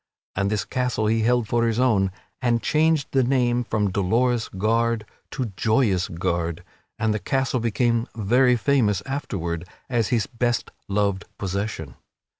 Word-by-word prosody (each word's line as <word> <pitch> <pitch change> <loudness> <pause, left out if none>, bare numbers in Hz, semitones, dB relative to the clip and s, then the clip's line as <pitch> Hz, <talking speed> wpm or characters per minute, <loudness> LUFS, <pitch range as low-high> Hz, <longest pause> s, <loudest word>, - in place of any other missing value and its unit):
(And 100 +1 +1
this 105 -2 -1
castle 125 -4 -1
he 110 +1 +2
held 120 0 +2
for 115 +1 +2
his 115 0 0
own 105 -7 +3 0.3
and 120 -3 +1
changed 155 -2 +2
the 135 - +3
name 125 -1 +2
from 105 -4 0
Dolorous 115 +5 +1
Gard 115 +3 0 0.2
to 125 -7 -4
Joyous 110 -5 +2
Gard 85 -1 -2 0.3
and 110 -1 +1
the 105 - -1
castle 130 +2 0
became 115 +1 +1
very 125 +4 +3
famous 110 -4 +2
afterward 90 - -4 0.2
as 115 -4 +2
his 115 -4 +1
best 120 -1 -1 0.2
loved 100 -1 0
possession. 95 - -4
115 Hz, 145 wpm, -24 LUFS, 100-125 Hz, 0.3 s, own